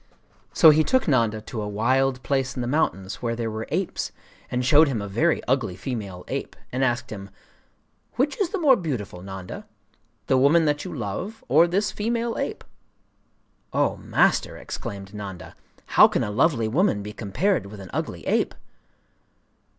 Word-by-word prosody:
So 160 - +8
he 155 +1 +4
took 260 +6 +1
Nanda 115 -7 +2
to 110 +1 -6
a 105 - -3
wild 130 +5 +1
place 135 -2 -1
in 125 - -3
the - - -3
mountains 115 -9 -1
where 115 -1 -1
there 115 -1 -3
were 110 +1 -5
apes, - - -2 0.4
and 125 0 -1
showed 150 +4 +6
him 130 -5 -1
a 100 - -4
very 150 +12 +1
ugly 125 -8 0
female 100 -4 -5
ape, - - -4 0.2
and 130 +2 0
asked 120 -1 0
him: 100 -2 -7 0.8
'Which 280 +8 0
is 375 - +2
the 400 - -2
more 295 -7 +5
beautiful, 125 - -4
Nanda, 95 -1 -8 0.6
—the 130 - +3
woman 155 +5 +5
that 150 0 0
you 185 - -6
love, 155 - -5
or 155 +7 +5
this 200 +4 0
female 230 +2 -1
ape?' - - -3 1.1
'Oh, - - +2
Master!' - - +1
exclaimed 100 0 -7
Nanda, 100 -3 -8 0.3
'how - - +7
can - - -1
a 105 - -3
lovely 125 -1 +2
woman 145 - +1
be 105 +1 -7
compared 115 - 0
with 105 0 -10
an 95 -2 -10
ugly - - -4
ape? - - +1
125 Hz, 170 wpm, -24 LUFS, 105-160 Hz, 1.1 s, So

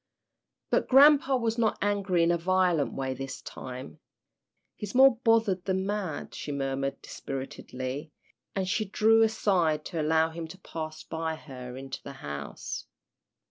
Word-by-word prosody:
But - - +2
grampa 275 0 +6
was 230 -1 -1
not 225 -2 +2
angry 200 -4 +1
in 170 - +4
a 170 - +2
violent 180 -3 +2
way 135 -1 -2
this 135 +1 -6
time. 130 +4 -8 0.8
"He's 210 +1 -7
more 265 -2 +7
bothered 225 -6 +2
than 190 0 0
mad," 200 -6 -3
she 145 - -5
murmured, 135 0 -2
dispiritedly, 135 +2 -6 0.4
and 190 -1 -1
she 215 +3 0
drew 220 +3 +4
aside 185 -8 +2
to 165 -3 -3
allow 160 +1 +2
him 165 0 -6
to 185 - -11
pass 155 -4 -6
by 160 0 -3
her 125 -5 -9
into 135 0 -7
the 140 - -8
house. 70 0 -5
170 Hz, 145 wpm, -28 LUFS, 140-205 Hz, 0.8 s, more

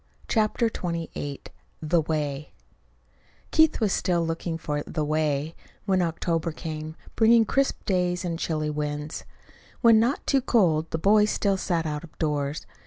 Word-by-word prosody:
CHAPTER 220 +1 +1
XXVIII 165 -8 -4 0.4
THE 160 +2 +2
WAY 150 -2 -3 1.0
Keith 315 -1 +4
was 215 -4 +1
still 170 -2 +1
looking 165 0 -3
for 150 -2 -3
"the 155 -2 -2
way," 155 0 0 0.3
when 190 -2 +2
October 165 0 -1
came, 155 -1 -6 0.2
bringing 225 0 +5
crisp 275 +5 0
days 180 -1 0
and 165 -2 -3
chilly 155 -3 -1
winds. 150 0 -4 0.6
When 230 -2 +7
not 240 +5 0
too 275 -2 +2
cold, 165 -11 +2
the - - -2
boys 210 +5 +4
still 200 -2 +1
sat 170 -3 -1
out 150 0 -3
of 170 - -14
doors. 150 -1 -2
165 Hz, 145 wpm, -26 LUFS, 155-200 Hz, 1.0 s, When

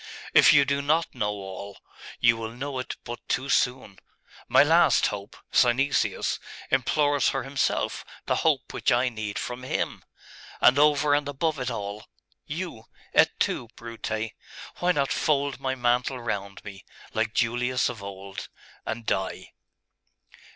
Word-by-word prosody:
If - - +8
you 145 -2 +6
do 140 0 0
not 155 +4 +1
know 105 -5 -1
all, 100 -1 -7 0.4
you 115 -1 +5
will 115 0 -5
know 135 +2 -4
it 130 - -5
but 120 0 -6
too 135 +2 -1
soon.... 125 -6 0 0.5
My - - +6
last 160 -2 +4
hope, 100 0 -4
Synesius, 130 +3 +2 0.3
implores 145 -1 +2
for 135 - -2
himself 135 -1 -1 0.2
the - - +1
hope - - +1
which - - +1
I 125 +1 +3
need 110 -3 -5
from 125 0 -4
him....And, 130 +1 -1
over 150 0 +4
and 145 0 +1
above 150 +1 -1
it 125 - -2
all.... 100 +1 -5 0.4
You!.... - - -5 0.3
Et - - +6
tu, 120 - 0
Brute! 115 -1 -4 0.5
Why 180 0 +3
not 140 -5 0
fold 140 -3 0
my 130 -1 -1
mantle 125 +1 +1
round 100 -4 -4
me, 100 -2 -9 0.3
like 110 - -1
Julius 125 +2 +1
of 120 -4 -6
old, 100 0 -8 0.4
and 115 0 -4
die! 95 -2 -2
125 Hz, 145 wpm, -26 LUFS, 110-140 Hz, 0.5 s, If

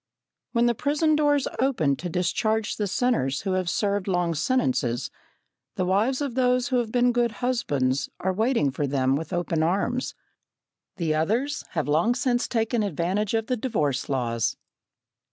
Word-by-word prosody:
When 235 -1 +3
the 240 - +3
prison 300 +5 +1
doors 290 -2 +2
open 225 - +2
to 175 +2 -5
discharge 205 +5 0
the 210 - -1
sinners 180 - 0
who 190 - -2
have 185 -2 0
served 200 0 0
long 175 -3 +1
sentences, 130 - 0 0.6
the 185 - 0
wives 215 +9 +1
of 280 -4 -2
those 250 +1 +2
who 255 - +2
have 235 -3 -1
been 245 0 +3
good 240 -1 +1
husbands 145 - 0
are 190 0 0
waiting 220 - +1
for 140 +2 -2
them 135 -1 +1
with 160 +5 -4
open 175 -2 -1
arms. 200 +9 0 0.8
The 165 -4 0
others 225 - 0
have 160 -4 -1
long 165 +11 +2
since 245 -1 0
taken 225 0 0
advantage 195 +3 -1
of 225 -1 0
the 250 - 0
divorce 155 - -1
laws. 120 -4 -1
205 Hz, 160 wpm, -25 LUFS, 160-245 Hz, 0.8 s, When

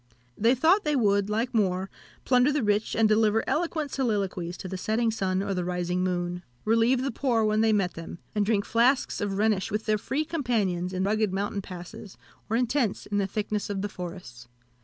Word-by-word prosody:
They 230 +4 +3
thought 335 - +4
they 300 -1 +1
would, 200 -5 +2
like 230 +4 -1
Moor, 190 -4 +1 0.4
plunder 250 +2 +4
the 290 -3 0
rich, 210 0 +1
and 225 -1 +4
deliver 215 0 +3
eloquent 315 -2 -1
soliloquies 195 -8 -1
to - - -7
the 190 - -5
setting 225 +4 0
sun 190 -3 -1
or 200 0 -2
the 180 -1 -1
rising 180 0 -1
moon; 175 -1 -2 0.2
relieve 230 +4 +3
the 275 - -1
poor 235 -2 +1
when 215 0 +2
they 220 0 +4
met 195 -4 +1
them, 165 0 -8 0.2
and 210 - +1
drink 205 -1 +1
flasks 245 +3 +2
of 200 -1 -2
Rhenish 210 -2 +1
with 210 +1 -2
their 215 -1 +1
free 290 +8 -2
companions 215 - -1
in 185 0 -1
rugged 215 0 +1
mountain 200 +1 -2
passes, 185 +1 -10 0.3
or 225 - +1
in 250 - +2
tents 240 -4 -1
in 205 0 -1
the 195 - 0
thicknesses 210 +1 -3
of 200 -1 -2
the 205 - -2
forests. 175 -11 -8
210 Hz, 200 wpm, -27 LUFS, 190-230 Hz, 0.4 s, thought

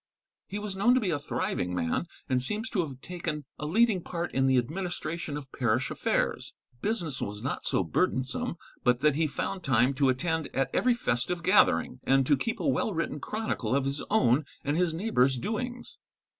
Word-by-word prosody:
He 205 - -4
was 205 -2 -4
known 225 +6 +4
to - - +4
be 200 -7 0
a 145 - 0
thriving 90 -9 -2
man, 85 - -1 0.2
and 130 -2 +1
seems 215 - -3
to 210 - 0
have 135 -6 -6
taken 160 -5 -4
a 150 - -3
leading 215 +2 +3
part 170 0 -4
in 135 0 +2
the 130 -1 +4
administration 160 +2 -2
of 135 -3 -9
parish 120 -5 0
affairs. - - -1 0.3
Business 175 - -1
was 105 +1 -4
not - - -3
so - - +2
burdensome 135 - -1 0.3
but 125 -1 +3
that 150 -2 +4
he 160 +1 +2
found 185 +6 -3
time 130 -2 +3
to 135 0 +2
attend 160 +3 0
at 135 0 +1
every 250 -1 +3
festive 170 - -1
gathering, 130 - +4
and 135 0 +3
to 145 - +4
keep 225 - -2
a 175 - -1
well 135 +11 +1
written 160 -2 -2
chronicle 210 - -2
of 140 -1 +1
his 140 +1 -2
own 150 - +4 0.2
and 145 +1 +1
his 175 0 +2
neighbours' 160 - +2
doings. 245 - -4
155 Hz, 190 wpm, -29 LUFS, 130-195 Hz, 0.3 s, known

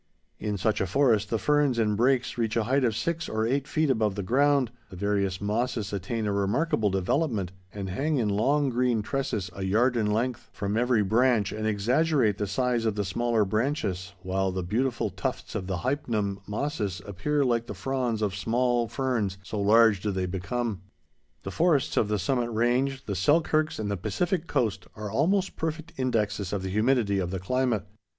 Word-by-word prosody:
In 105 -1 -2
such 105 +3 0
a 95 - 0
forest, 115 0 +2
the 115 - +1
ferns 145 0 +2
and 105 -2 +2
brakes 125 +3 +2
reach 115 -2 -1
a 115 - +2
height 135 +5 +1
of 115 -4 +1
six 170 +6 -2
or 110 0 0
eight 135 +4 0
feet 155 -2 +1
above 110 -5 +1
the 100 - -3
ground, 135 +3 +2 0.2
the - - -10
various 100 -1 0
mosses 105 0 -1
attain 105 +3 -2
a 105 - 0
remarkable 105 +3 +1
development, 95 - 0 0.2
and 100 -2 -5
hang 140 +11 -1
in 115 -4 +1
long, 135 +8 +2
green 120 -3 +1
tresses, 105 -7 -2
a 100 - -8
yard 115 +7 +2
in 110 -3 +1
length, 120 +2 -1
from 100 +1 -3
every 120 -2 +2
branch, 110 -1 +2
and 110 0 -3
exaggerate 115 +1 +2
the 105 - -1
size 125 +1 0
of 110 - 0
the 105 -1 -1
smaller 115 +2 +1
branches, 100 - -1
while 95 +1 0
the 95 0 -3
beautiful 115 +7 -1
tufts - - -4
of 95 - -3
the 95 -2 -2
Hypnum 110 - -1
mosses 105 - -3
appear 135 +9 0
like 120 -2 +1
the 105 - -6
fronds 120 +1 -1
of 100 -3 0
small 120 +3 +1
ferns, 115 -5 -1
so 105 +2 -4
large 110 -1 +5
do 105 - -1
they 95 -2 -1
become. 100 +3 -3 0.6
The 95 - -5
forests 160 - +2
of 105 - +2
the 105 0 0
Summit 120 +5 0
Range, 125 +4 0
the 100 - -3
Selkirks, 155 - +2
and 105 -2 -2
the 100 - -1
Pacific 170 - -1
Coast 110 -9 -1
are 105 -1 -6
almost 185 - +1
perfect 160 0 -4
indexes 105 -6 -1
of 100 -2 -2
the 95 - -3
humidity 110 -1 +2
of 90 -2 -1
the 95 - -3
climate. 120 +1 0
110 Hz, 190 wpm, -27 LUFS, 100-130 Hz, 0.6 s, large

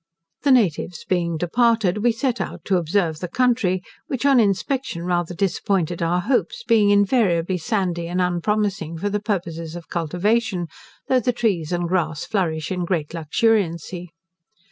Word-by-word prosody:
The 280 - +1
natives 180 - +1
being 170 -3 0
departed, 215 +2 +2
we 240 +3 +3
set 245 +1 -1
out - - -6
to 190 - +2
observe 165 -2 0
the 180 - -4
country, 220 -5 +1 0.2
which, 265 -1 -3
on 275 -3 +5
inspection, 210 -1 0
rather 175 -1 -1
disappointed 180 -2 0
our 175 +2 +1
hopes, 270 - 0
being 215 - +4
invariably 195 -4 +2
sandy 180 -4 -1
and 180 +2 -2
unpromising 180 -1 0
for 205 +5 -2
the 210 - 0
purposes 170 -6 -3
of 175 -1 -9
cultivation, 180 +2 0 0.4
though 260 - +3
the 250 +1 +1
trees 200 -10 -1
and 175 -1 0
grass 165 -4 -1
flourish 160 -6 -1
in 180 -1 -1
great 170 -4 -1
luxuriancy. 175 0 0
185 Hz, 150 wpm, -22 LUFS, 170-220 Hz, 0.4 s, on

